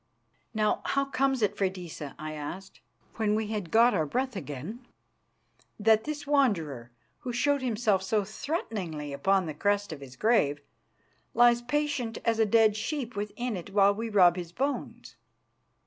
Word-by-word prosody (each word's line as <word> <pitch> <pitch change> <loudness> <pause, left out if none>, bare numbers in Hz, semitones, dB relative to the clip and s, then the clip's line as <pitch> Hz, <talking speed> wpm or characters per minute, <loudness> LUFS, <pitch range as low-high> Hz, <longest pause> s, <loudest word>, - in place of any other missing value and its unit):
"Now, 215 -1 +1
how 275 0 0
comes 270 -2 0
it, 205 0 +1
Freydisa," 180 -7 -4
I 155 0 -6
asked, 170 +6 -7 0.4
when 215 -2 +1
we 220 0 0
had 210 -6 -3
got 235 +5 +5
our 160 -5 0
breath 255 - -2
again, 155 - -6 1.0
"that 220 +1 +4
this 295 -1 -4
Wanderer, 170 - +1 0.3
who 255 -4 -5
showed 285 +3 +1
himself 220 -5 +1
so 205 +2 0
threateningly 195 - -4
upon 190 +6 +2
the 155 - -4
crest 205 +3 0
of 145 - -10
his 130 -2 -11
grave, 150 - +2 0.8
lies 240 0 +5
patient 260 -3 -1
as 225 -1 +1
a 220 - +4
dead 220 0 +4
sheep 245 +1 -3
within 210 +3 -3
it 180 +1 -7
while 200 0 +5
we 225 +2 -4
rob 185 -4 +5
his 175 -2 -6
bones?" 275 +8 -4
210 Hz, 155 wpm, -28 LUFS, 180-240 Hz, 1.0 s, got